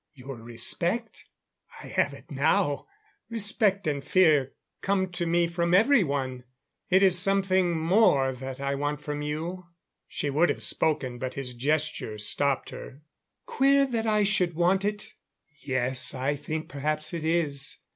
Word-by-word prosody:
Your 135 Hz, -1 st, -9 dB
respect? 170 Hz, -, -2 dB, 0.6 s
I -, -, -10 dB
have -, -, 0 dB
it -, -, -16 dB
now. -, -, +1 dB, 0.4 s
Respect 205 Hz, -3 st, +1 dB
and 145 Hz, -2 st, -1 dB
fear 155 Hz, -8 st, +3 dB, 0.3 s
come 190 Hz, -2 st, 0 dB
to 175 Hz, -1 st, -2 dB
me 170 Hz, +1 st, +2 dB
from 170 Hz, +1 st, 0 dB
everyone. 145 Hz, -, +2 dB, 0.5 s
It 190 Hz, +1 st, +4 dB
is 180 Hz, -2 st, +4 dB
something 190 Hz, -3 st, +1 dB
more 160 Hz, -6 st, +3 dB
than 125 Hz, -, -10 dB
that 130 Hz, 0 st, -6 dB
I 140 Hz, 0 st, -1 dB
want 145 Hz, +1 st, -2 dB
from 150 Hz, 0 st, -4 dB
you." 165 Hz, +5 st, -4 dB, 0.4 s
She 145 Hz, -, -3 dB
would 160 Hz, +5 st, +3 dB
have -, -, -2 dB
spoken, 130 Hz, -6 st, 0 dB
but 130 Hz, 0 st, -4 dB
his 130 Hz, -2 st, -5 dB
gesture 145 Hz, -3 st, -1 dB
stopped 135 Hz, +6 st, -1 dB
her. 140 Hz, +3 st, -10 dB, 0.4 s
"Queer 275 Hz, -, +3 dB
that 230 Hz, -4 st, -2 dB
I 210 Hz, -1 st, +3 dB
should 185 Hz, -5 st, +1 dB
want 180 Hz, +3 st, +2 dB
it? 210 Hz, +1 st, -3 dB, 0.5 s
Yes, 130 Hz, -1 st, 0 dB
I 135 Hz, +3 st, -1 dB
think 155 Hz, +2 st, -5 dB
perhaps 155 Hz, +3 st, -3 dB
it 165 Hz, -2 st, -4 dB
is. 150 Hz, -4 st, +1 dB
155 Hz, 150 wpm, -27 LUFS, 140-190 Hz, 0.6 s, It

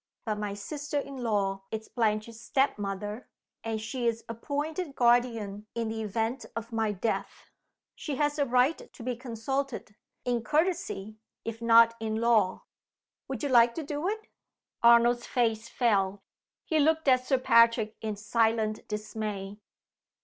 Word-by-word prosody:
But 215 Hz, -2 st, -2 dB
my 205 Hz, -1 st, -3 dB
sister 290 Hz, +8 st, -4 dB
in 280 Hz, -1 st, -4 dB
law 200 Hz, -5 st, -1 dB
is 220 Hz, 0 st, -5 dB
Blanche's 225 Hz, -1 st, -1 dB
step 270 Hz, -1 st, +1 dB
mother, 205 Hz, +3 st, -4 dB, 0.3 s
and 225 Hz, -1 st, -2 dB
she 235 Hz, +3 st, -2 dB
is 230 Hz, 0 st, -1 dB
appointed 290 Hz, +7 st, -3 dB
guardian 230 Hz, -4 st, +2 dB
in 230 Hz, -1 st, -1 dB
the 220 Hz, 0 st, -3 dB
event 225 Hz, +4 st, -2 dB
of 230 Hz, +1 st, -5 dB
my 220 Hz, -1 st, +1 dB
death. 205 Hz, +3 st, -3 dB, 0.4 s
She 295 Hz, -, -5 dB
has 295 Hz, +2 st, 0 dB
a 285 Hz, -, +3 dB
right 250 Hz, +5 st, +2 dB
to -, -, -11 dB
be 250 Hz, 0 st, -2 dB
consulted 250 Hz, 0 st, -4 dB, 0.3 s
in 240 Hz, -2 st, 0 dB
courtesy, 270 Hz, -, -1 dB, 0.3 s
if 230 Hz, 0 st, -5 dB
not 230 Hz, 0 st, +6 dB
in 220 Hz, -1 st, -2 dB
law. 225 Hz, -4 st, +2 dB, 0.6 s
Would -, -, -5 dB
you 285 Hz, -, 0 dB
like 235 Hz, -2 st, +5 dB
to 325 Hz, -, -3 dB
do 295 Hz, +3 st, -3 dB
it?" 435 Hz, +1 st, -4 dB, 0.6 s
Arnold's 235 Hz, +1 st, +5 dB
face 230 Hz, -2 st, 0 dB
fell. 200 Hz, -5 st, +1 dB, 0.4 s
He 315 Hz, -, +1 dB
looked 320 Hz, +1 st, +2 dB
at 255 Hz, -1 st, +4 dB
Sir 265 Hz, -, +3 dB
Patrick 230 Hz, -3 st, +4 dB
in 215 Hz, -1 st, -3 dB
silent 220 Hz, +1 st, 0 dB
dismay. 210 Hz, -1 st, -5 dB
230 Hz, 150 wpm, -29 LUFS, 215-260 Hz, 0.6 s, not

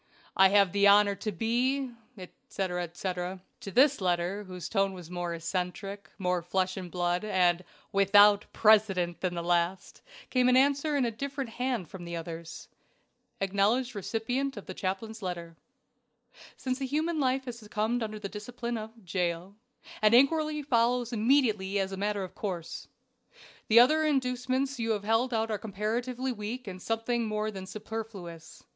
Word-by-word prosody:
"I 190 Hz, 0 st, +7 dB
have 200 Hz, -2 st, +4 dB
the 200 Hz, 0 st, +4 dB
honor 205 Hz, 0 st, +6 dB
to 215 Hz, -, -3 dB
be, 245 Hz, +7 st, 0 dB, 0.3 s
etc., 180 Hz, -1 st, -4 dB
etc." 180 Hz, +2 st, -4 dB, 0.2 s
To -, -, -7 dB
this 265 Hz, +3 st, +4 dB
letter, 180 Hz, +2 st, 0 dB
whose 180 Hz, -2 st, -7 dB
tone 195 Hz, -2 st, +1 dB
was 175 Hz, -2 st, -10 dB
more 175 Hz, -1 st, -3 dB
eccentric, 185 Hz, +4 st, -4 dB
more 180 Hz, -2 st, 0 dB
flesh 185 Hz, +2 st, -1 dB
and 185 Hz, -2 st, -6 dB
blood, 175 Hz, +1 st, -1 dB
and 180 Hz, -4 st, +2 dB, 0.3 s
WITHOUT 205 Hz, +1 st, +5 dB
PRECEDENT, 200 Hz, -6 st, +3 dB
than 180 Hz, -2 st, -1 dB
the 170 Hz, -, -3 dB
last, 175 Hz, +2 st, -1 dB, 0.3 s
came 255 Hz, -1 st, +3 dB
an 255 Hz, -, +5 dB
answer 285 Hz, +2 st, +3 dB
in 265 Hz, -, +2 dB
a 235 Hz, -, 0 dB
different 275 Hz, +1 st, -5 dB
hand 245 Hz, -7 st, -2 dB
from 180 Hz, +2 st, -9 dB
the 170 Hz, 0 st, -5 dB
others. 165 Hz, 0 st, -7 dB, 0.4 s
" -, -, -42 dB
acknowledged 205 Hz, +7 st, +1 dB
receipt 235 Hz, +6 st, -2 dB
of 205 Hz, -, -7 dB
the 185 Hz, -, -6 dB
chaplain's 210 Hz, +5 st, -4 dB
letter. 170 Hz, -3 st, -5 dB, 1.0 s
"Since 255 Hz, +1 st, -3 dB
a -, -, 0 dB
human 310 Hz, +4 st, -1 dB
life 265 Hz, -1 st, +1 dB
has 240 Hz, -2 st, -6 dB
succumbed 220 Hz, +2 st, -1 dB
under 215 Hz, -1 st, -3 dB
the 210 Hz, -1 st, -5 dB
discipline 235 Hz, +3 st, -5 dB
of 220 Hz, -1 st, -10 dB
Jail, 175 Hz, +1 st, -2 dB, 0.5 s
an 215 Hz, +2 st, +5 dB
inquiry 300 Hz, +3 st, +3 dB
follows 245 Hz, -2 st, +1 dB
immediately 220 Hz, -5 st, +2 dB
as 195 Hz, -1 st, -1 dB
a -, -, -3 dB
matter 205 Hz, 0 st, -1 dB
of 185 Hz, -, -8 dB
course. 180 Hz, -5 st, -5 dB, 0.8 s
The 225 Hz, +2 st, +7 dB
other 310 Hz, +6 st, +5 dB
inducements 260 Hz, -1 st, 0 dB
you 225 Hz, -1 st, +1 dB
have 205 Hz, -2 st, -3 dB
held 225 Hz, +4 st, +1 dB
out 225 Hz, -1 st, 0 dB
are 210 Hz, -, -1 dB
comparatively 235 Hz, +5 st, -2 dB
weak 235 Hz, +3 st, -5 dB
and 185 Hz, -2 st, -7 dB
something 225 Hz, +2 st, -1 dB
more 215 Hz, 0 st, -1 dB
than 190 Hz, -2 st, -8 dB
superfluous. 200 Hz, -5 st, -8 dB
210 Hz, 165 wpm, -29 LUFS, 185-245 Hz, 1.0 s, I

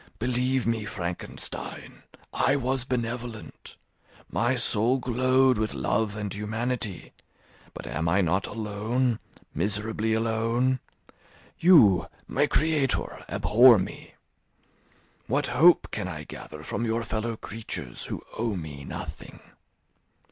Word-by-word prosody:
Believe 125 Hz, +1 st, 0 dB
me, 115 Hz, -1 st, 0 dB
Frankenstein, 90 Hz, -4 st, -5 dB, 0.3 s
I 135 Hz, -, +2 dB
was 130 Hz, -1 st, 0 dB
benevolent; 120 Hz, -3 st, -5 dB, 0.6 s
my 120 Hz, +3 st, +1 dB
soul 120 Hz, +1 st, +2 dB
glowed 130 Hz, 0 st, +3 dB
with 110 Hz, 0 st, -1 dB
love 105 Hz, -1 st, 0 dB
and 105 Hz, -2 st, -4 dB
humanity; 110 Hz, -1 st, -3 dB, 0.6 s
but -, -, -8 dB
am 80 Hz, +1 st, -2 dB
I 95 Hz, +4 st, +3 dB
not 95 Hz, +2 st, +1 dB
alone, 110 Hz, +3 st, -1 dB, 0.3 s
miserably 105 Hz, +4 st, 0 dB
alone? 115 Hz, +3 st, +1 dB, 0.8 s
You, 130 Hz, -, +6 dB, 0.2 s
my -, -, +2 dB
creator, 155 Hz, -4 st, 0 dB
abhor 120 Hz, +1 st, +6 dB
me; 95 Hz, -, -6 dB, 1.1 s
what 140 Hz, +4 st, +1 dB
hope 165 Hz, +7 st, +5 dB
can -, -, -3 dB
I 75 Hz, -4 st, -6 dB
gather 75 Hz, 0 st, -9 dB
from 115 Hz, -, -3 dB
your 115 Hz, 0 st, 0 dB
fellow 110 Hz, +1 st, -3 dB
creatures, 110 Hz, -, -4 dB
who -, -, -5 dB, 0.2 s
owe 115 Hz, -2 st, 0 dB
me 75 Hz, -5 st, -7 dB
nothing? -, -, -8 dB
115 Hz, 110 wpm, -27 LUFS, 105-125 Hz, 1.1 s, You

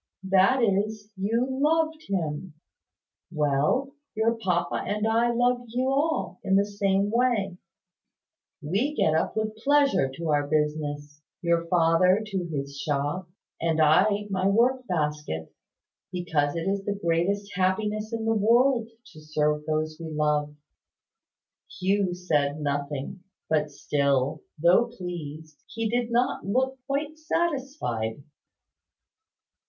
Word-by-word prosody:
"That 195 Hz, +7 st, +4 dB
is, 210 Hz, +1 st, 0 dB
you 220 Hz, +6 st, 0 dB
loved 315 Hz, +4 st, +1 dB
him. 165 Hz, -3 st, -3 dB, 0.8 s
Well: 150 Hz, -, +1 dB, 0.2 s
your 220 Hz, +1 st, +2 dB
papa 180 Hz, -6 st, -1 dB
and 210 Hz, +1 st, 0 dB
I 230 Hz, +2 st, +3 dB
love 245 Hz, +1 st, +1 dB
you 250 Hz, +3 st, -1 dB
all, 305 Hz, +4 st, 0 dB
in 195 Hz, -1 st, +2 dB
the 200 Hz, +1 st, +4 dB
same 200 Hz, 0 st, 0 dB
way. 225 Hz, -6 st, +1 dB, 1.0 s
We 210 Hz, -, 0 dB
get 155 Hz, -, +2 dB
up 160 Hz, +6 st, 0 dB
with 215 Hz, 0 st, -1 dB
pleasure 275 Hz, -, +3 dB
to 165 Hz, +1 st, -4 dB
our 145 Hz, -1 st, +2 dB
business 150 Hz, -1 st, -2 dB, 0.2 s
your 170 Hz, -1 st, +1 dB
father 180 Hz, +3 st, +4 dB
to 195 Hz, -4 st, -3 dB
his 140 Hz, -3 st, -5 dB
shop, 145 Hz, +5 st, -2 dB, 0.3 s
and 165 Hz, -1 st, +1 dB
I 155 Hz, +6 st, +5 dB
to 205 Hz, 0 st, -2 dB
my 190 Hz, 0 st, +1 dB
work 245 Hz, +5 st, +2 dB
basket 150 Hz, -, -2 dB, 0.6 s
because 160 Hz, -5 st, 0 dB
it 165 Hz, +2 st, -2 dB
is 195 Hz, 0 st, 0 dB
the 205 Hz, 0 st, -2 dB
greatest 195 Hz, +4 st, 0 dB
happiness 210 Hz, +4 st, 0 dB
in 225 Hz, -1 st, -3 dB
the 225 Hz, -, +2 dB
world 235 Hz, +2 st, +3 dB, 0.2 s
to 155 Hz, -, -12 dB
serve 150 Hz, 0 st, -1 dB
those 155 Hz, 0 st, -1 dB
we 165 Hz, -, -6 dB
love." 150 Hz, -1 st, 0 dB, 1.2 s
Hugh 190 Hz, -1 st, +1 dB
said 150 Hz, -5 st, 0 dB
nothing; 145 Hz, +4 st, -3 dB, 0.3 s
but 150 Hz, -1 st, +2 dB
still, 140 Hz, 0 st, 0 dB, 0.2 s
though 175 Hz, +9 st, +5 dB
pleased, 160 Hz, -8 st, -8 dB
he 225 Hz, 0 st, -3 dB
did 240 Hz, -1 st, 0 dB
not 240 Hz, +2 st, +1 dB
look 260 Hz, +6 st, 0 dB
quite 295 Hz, +3 st, -2 dB
satisfied. 270 Hz, -, -2 dB
190 Hz, 125 wpm, -26 LUFS, 155-230 Hz, 1.2 s, I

